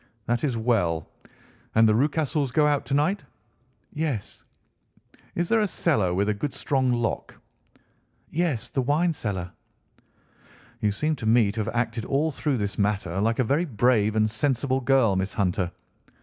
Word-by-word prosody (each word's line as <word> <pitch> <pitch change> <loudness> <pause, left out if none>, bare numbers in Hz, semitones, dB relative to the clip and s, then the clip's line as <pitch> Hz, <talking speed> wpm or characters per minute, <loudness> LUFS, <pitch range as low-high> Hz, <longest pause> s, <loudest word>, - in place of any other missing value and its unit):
"That 120 0 -1
is 130 -6 0
well. 100 -9 0 0.7
And 110 0 +6
the 110 - +4
Rucastles 145 +2 0
go 150 +3 +3
out 145 -4 +1
to 135 - 0
night?" 170 +8 +1 0.7
"Yes." 145 -9 -3 0.9
"Is 175 0 0
there 225 +3 +3
a 210 - +2
cellar 140 - +1
with 100 +3 0
a 105 - +2
good 130 +7 -4
strong 130 -3 +1
lock?" 120 -2 -2 1.0
"Yes, 160 -8 0
the 135 - -1
wine 155 +6 +1
cellar." 95 - -4 1.3
"You 105 - +1
seem 155 +9 -1
to 110 - -4
me 110 -2 +4
to 110 - -6
have 110 +2 -2
acted 115 -1 -1
all 150 +4 +1
through 140 -1 -1
this 100 -1 -3
matter 100 -3 0
like 115 +2 +1
a 130 - +3
very 140 +9 +1
brave 110 - +2
and 110 0 +3
sensible 130 +3 0
girl, 125 -6 +3
Miss 95 +1 -2
Hunter. 90 -3 0
120 Hz, 165 wpm, -25 LUFS, 105-145 Hz, 1.3 s, And